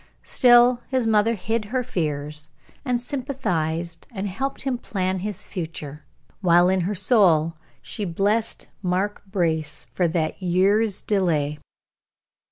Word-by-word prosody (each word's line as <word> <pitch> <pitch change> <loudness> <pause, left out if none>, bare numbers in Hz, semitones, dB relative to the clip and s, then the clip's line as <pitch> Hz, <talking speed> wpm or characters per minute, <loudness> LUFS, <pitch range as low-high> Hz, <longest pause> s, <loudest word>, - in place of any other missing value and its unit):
Still 245 0 +5
his 260 -3 0
mother 220 +1 +3
hid 220 +3 -2
her 250 +4 -1
fears, 150 - -3 0.3
and 250 -4 0
sympathized 175 - -3
and 205 -3 -4
helped 265 +9 -3
him 260 -3 -1
plan 185 -4 -2
his 205 0 -5
future, 155 -5 -6 0.3
while 175 -1 +5
in 190 0 +2
her 195 +4 -1
soul 180 -6 +3 0.3
she 210 - -5
blessed 205 +5 -1 0.2
Mark 190 +2 -1
Brace 160 - -2
for 175 +8 +1
that 160 +1 -2
year's 195 +4 +2
delay. 155 -7 0
190 Hz, 125 wpm, -23 LUFS, 165-225 Hz, 0.3 s, Still